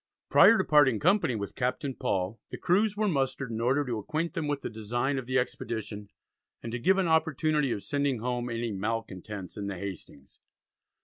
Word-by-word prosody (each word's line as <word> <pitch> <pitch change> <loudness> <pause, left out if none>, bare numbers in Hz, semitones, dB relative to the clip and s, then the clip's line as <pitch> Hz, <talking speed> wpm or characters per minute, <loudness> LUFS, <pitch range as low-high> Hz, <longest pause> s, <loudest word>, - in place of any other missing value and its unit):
Prior 230 - +8
to 190 - +2
parting 140 - +4
company 180 - +3
with 100 -2 -4
Captain 130 +3 -2
Paul 95 -1 -2
the - - -6
crews 205 +4 +2
were 215 0 +1
mustered 135 - -1
in 115 0 -3
order 135 +5 +2
to 120 -4 -2
acquaint 155 +9 -2
them 155 - -2
with 145 -1 -1
the - - -4
design 120 +5 -1
of 125 - -8
the 130 +1 +1
expedition, 110 -4 -3 0.5
and 115 - -5
to 125 - -3
give 190 +11 +3
an 190 -2 +2
opportunity 155 -3 +2
of 100 - -3
sending 140 -2 0
home 125 +1 -2
any 115 -1 -2
"malcontents" 105 -2 -4
in 100 -1 -4
the 100 -2 -4
Hastings. 90 -7 -9
125 Hz, 190 wpm, -29 LUFS, 110-150 Hz, 0.5 s, Prior